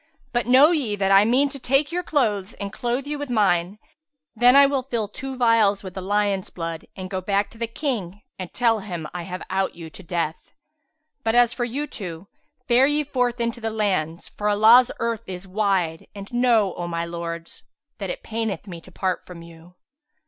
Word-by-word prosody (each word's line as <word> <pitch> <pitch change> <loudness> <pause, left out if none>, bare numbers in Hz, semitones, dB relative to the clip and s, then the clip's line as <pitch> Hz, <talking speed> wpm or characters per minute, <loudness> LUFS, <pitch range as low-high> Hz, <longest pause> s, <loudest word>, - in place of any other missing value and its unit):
But 240 -1 0
know 265 +6 +7
ye 265 -11 0
that 195 -1 0
I 195 +1 +7
mean 255 +5 +3
to 275 - -8
take 275 +4 +1
your 355 +1 -1
clothes 215 - 0
and 200 -1 -6
clothe 245 +3 -2
you 295 0 -4
with 290 -2 -5
mine; 195 -4 +1 0.6
then 245 +3 +5
will 275 -2 -1
I - - -40
fill 225 -4 -1
two 265 +5 -7
vials 225 -5 +3
with 185 -2 -7
the 190 - -5
lion's 200 0 0
blood 165 -2 -6
and 185 -1 -6
go 185 0 -3
back 200 +2 0
to 225 - -16
the 230 - -1
King 225 - -4 0.2
and 185 -2 -6
tell 230 -2 +2
him 175 -6 -6
I 175 - -4
have 180 +1 -6
out 190 0 0
vou 165 -2 -9
to - - -10
death. 170 -2 -4 0.7
But 225 +1 +1
as 240 -1 +5
for 240 - -2
you 270 +5 -3
two, 180 - -8 0.4
fare 255 +2 +5
ye 295 +1 +1
forth 250 -3 -1
into 235 0 -2
the 225 - -1
lands, 190 -7 -1
for 210 0 -2
Allah's 225 +5 +6
earth 230 -2 -2
is 185 +1 -7
wide; 185 -5 0
and 200 +3 -9
know, 235 -6 +3
O 175 - -5
my 170 0 -2
lords, 170 0 -6 0.4
that - - -4
it - - -5
paineth 225 -2 -3
me 170 -3 -8
to - - -16
part 185 -2 -2
from 170 -2 -10
you." 170 +1 -15
210 Hz, 205 wpm, -23 LUFS, 185-245 Hz, 0.7 s, know